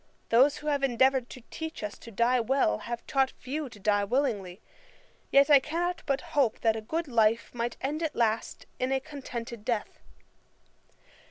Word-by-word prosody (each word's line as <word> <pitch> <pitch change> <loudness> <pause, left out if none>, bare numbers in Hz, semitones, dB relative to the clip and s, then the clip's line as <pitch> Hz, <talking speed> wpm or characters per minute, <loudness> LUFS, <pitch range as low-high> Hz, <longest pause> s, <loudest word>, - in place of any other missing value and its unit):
Those 270 +6 +5
who 300 - -11
have 290 -2 +1
endeavoured 260 0 +2
to 255 - -11
teach 320 -7 -6
us 210 -1 -4
to - - -11
die 235 +3 +2
well, 230 - +1
have 235 0 -6
taught 270 -1 +2
few 280 +2 -4
to 220 - -14
die 205 0 +2
willingly: 205 -6 -1 0.7
yet 275 0 +6
I 285 - +9
cannot 340 +5 -2
but 275 -1 +1
hope 265 -7 +2
that 225 -1 +3
a 220 - -4
good 320 +9 -3
life 230 -2 +2
might 235 0 -3
end 295 +4 -2
at 315 -4 -2
last 225 -1 -1
in 255 +1 0
a 270 - +2
contented 245 -6 -7
death. 230 -2 -2
255 Hz, 175 wpm, -28 LUFS, 230-280 Hz, 0.7 s, I